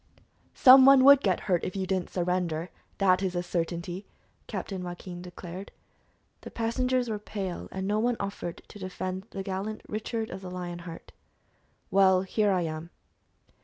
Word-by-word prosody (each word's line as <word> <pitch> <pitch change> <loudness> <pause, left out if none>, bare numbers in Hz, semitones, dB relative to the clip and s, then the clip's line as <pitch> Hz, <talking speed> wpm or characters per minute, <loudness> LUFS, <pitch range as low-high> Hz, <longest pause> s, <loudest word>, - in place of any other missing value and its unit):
"Some 260 +1 +9
one 270 -1 +8
would 280 0 +8
get 190 -7 +1
hurt 180 -4 0
if 185 - -4
you 190 -1 -1
didn't 185 -1 -1
surrender, 175 -2 -1 0.3
that 185 -2 +3
is 185 -2 -1
a 175 - -1
certainty," 175 +2 -3 0.4
Captain 190 -2 -5
Joaquin 175 0 -7
declared. 180 +1 -9 0.7
The - - -8
passengers 250 +2 0
were 215 -2 -3
pale, 195 -4 -5
and 190 0 -4
no 210 +1 +1
one 240 +1 +1
offered 200 -3 -5
to 205 - -11
defend 185 +1 -5
the 195 - -5
gallant 195 +2 -4
Richard 220 +1 -3
of 190 +1 -7
the 185 - -7
Lion 175 -1 -5
Heart. 165 - -10 0.8
"Well, 190 -1 +5
here 205 +2 +1
I 185 -2 +2
am." 160 +1 -5
190 Hz, 165 wpm, -28 LUFS, 180-210 Hz, 0.8 s, Some